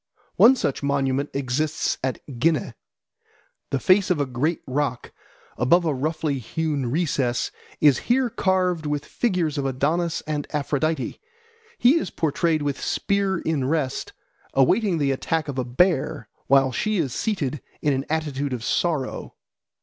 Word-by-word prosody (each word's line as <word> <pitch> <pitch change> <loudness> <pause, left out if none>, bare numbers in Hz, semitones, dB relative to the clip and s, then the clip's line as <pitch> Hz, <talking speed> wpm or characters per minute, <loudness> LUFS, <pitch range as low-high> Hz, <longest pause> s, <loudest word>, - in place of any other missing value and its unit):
One 255 +4 +7
such 145 - -2
monument 140 0 0
exists 140 +3 -1
at 130 -2 -3
Ghineh. 155 -4 +1 1.0
The 135 - 0
face 185 +6 +4
of 180 -4 +2
a 145 - +1
great 135 +6 -1
rock, 135 -2 -2 0.5
above 170 +9 +4
a 155 - +1
roughly 150 +1 -1
hewn 145 0 -2
recess, 135 -5 0 0.3
is 145 -4 +5
here 255 +1 +3
carved 180 -5 +1
with 145 -1 -2
figures 175 - -1
of 135 - -1
Adonis 155 +6 0
and 150 -2 -3
Aphrodite. 150 0 -1 0.6
He 270 +7 +5
is - - -4
portrayed 160 0 0
with 145 -1 -2
spear 200 -2 0
in 155 -6 -1
rest, 140 -2 -1 0.4
awaiting 180 - +3
the 140 -3 +1
attack 155 +4 -1
of 135 -2 -3
a - - +1
bear, 135 +5 +1 0.2
while 135 -1 +4
she 215 - -1
is 140 -8 -1
seated 150 - -2 0.2
in 145 - +1
an 135 +1 -2
attitude 145 -3 -2
of 120 -3 -4
sorrow. 150 -2 -1
150 Hz, 145 wpm, -24 LUFS, 135-170 Hz, 1.0 s, One